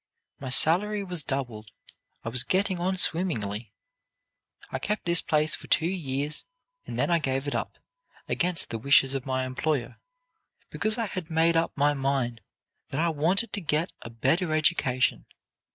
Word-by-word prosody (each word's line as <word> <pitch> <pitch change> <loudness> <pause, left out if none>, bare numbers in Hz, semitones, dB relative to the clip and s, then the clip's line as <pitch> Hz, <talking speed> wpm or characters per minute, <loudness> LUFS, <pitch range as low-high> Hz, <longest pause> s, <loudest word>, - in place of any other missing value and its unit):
My 135 - -5
salary 200 +10 +4
was 180 -5 -4
doubled; 120 -7 -4 0.5
I - - -3
was 125 +1 +3
getting 190 -1 0
on 185 +2 0
swimmingly. 115 - 0 1.0
"I 130 - -2
kept 210 +9 -3
this 170 -1 +5
place 155 0 +1
for - - -6
two 160 - +3
years, 150 -5 -3 0.4
and - - -5
then - - +1
I 170 - +4
gave 135 -1 -2
it 145 - -2
up, - - -3 0.5
against 180 -1 0
the 115 - -3
wishes 135 +2 +4
of 135 -1 -4
my 130 0 0
employer, 130 0 -2 0.7
because 215 +1 -1
I 230 - 0
had 185 -4 -6
made 165 +1 +3
up 165 -1 0
my 145 +1 +3
mind 135 -4 -1 0.5
that 135 - -3
I 170 +1 +2
wanted 180 +9 +1
to 205 - -1
get 155 +2 -1
a - - -8
better 155 +9 0
education. 140 -5 +1
150 Hz, 165 wpm, -27 LUFS, 130-175 Hz, 1.0 s, this